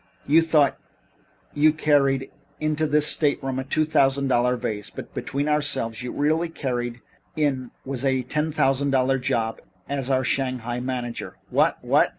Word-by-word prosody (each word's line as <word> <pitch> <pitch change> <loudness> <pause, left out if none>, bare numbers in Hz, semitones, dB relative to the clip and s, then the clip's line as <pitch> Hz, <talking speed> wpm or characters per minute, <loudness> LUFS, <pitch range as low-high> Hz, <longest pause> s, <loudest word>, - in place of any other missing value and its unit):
You 155 +4 +5
thought 155 -4 +2 0.7
you 155 +1 +4
carried 140 -3 +2 0.3
into 155 0 0
this 150 0 +3
stateroom 145 -3 +1
a - - -2
two 155 +4 +1
thousand 140 -2 +2
dollar 125 0 +2
vase, 110 -4 -3
but - - -9
between 140 +2 -3
ourselves, 145 -6 +1
what - - -5
you 125 - -4
really 160 +3 0
carried 120 -6 -3 0.3
in 135 -5 0 0.2
was 135 -1 -4
a 130 -2 +1
ten 150 +5 -1
thousand 140 -1 +1
dollar 135 0 +2
job 115 -2 -1 0.3
as 140 -2 -3
our 130 -1 +2
Shanghai 125 -3 -1
manager." 125 -2 -4 0.2
"Wha - - +3
what!" - - +3
135 Hz, 160 wpm, -24 LUFS, 125-150 Hz, 0.7 s, You